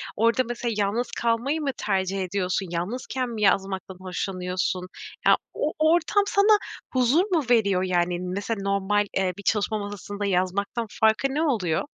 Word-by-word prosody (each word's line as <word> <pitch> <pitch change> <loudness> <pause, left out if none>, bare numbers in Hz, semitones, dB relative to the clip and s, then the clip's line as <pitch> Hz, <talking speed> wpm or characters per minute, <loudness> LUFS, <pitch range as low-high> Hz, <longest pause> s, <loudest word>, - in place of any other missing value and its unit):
orada 230 +3 +3
mesela 240 -1 -3
yalnız 215 +4 0
kalmayı 235 +7 0
mı 280 -2 0
tercih 190 0 -1
ediyorsun? 185 +1 -1
Yalnızken 245 +8 -3
mi 225 -2 -5
yazmaktan 195 -2 +1
hoşlanıyorsun? 185 0 -3 0.4
Ya, - - +6 0.2
o 300 - -1
ortam 330 +5 +3
sana 415 +2 +5 0.4
huzur 255 +6 +4
mu 325 -4 +2
veriyor? 200 -6 +3
Yani, 175 -1 +1
mesela 200 +4 -3
normal, 200 +1 +1
eee, 190 -1 +1
bir 200 - -9
çalışma 215 +2 +1
masasında 205 0 -5
yazmaktan 200 +4 0
farkı 220 +4 +4
ne 300 - 0
oluyor? 210 - +1
205 Hz, 145 wpm, -25 LUFS, 185-240 Hz, 0.4 s, Ya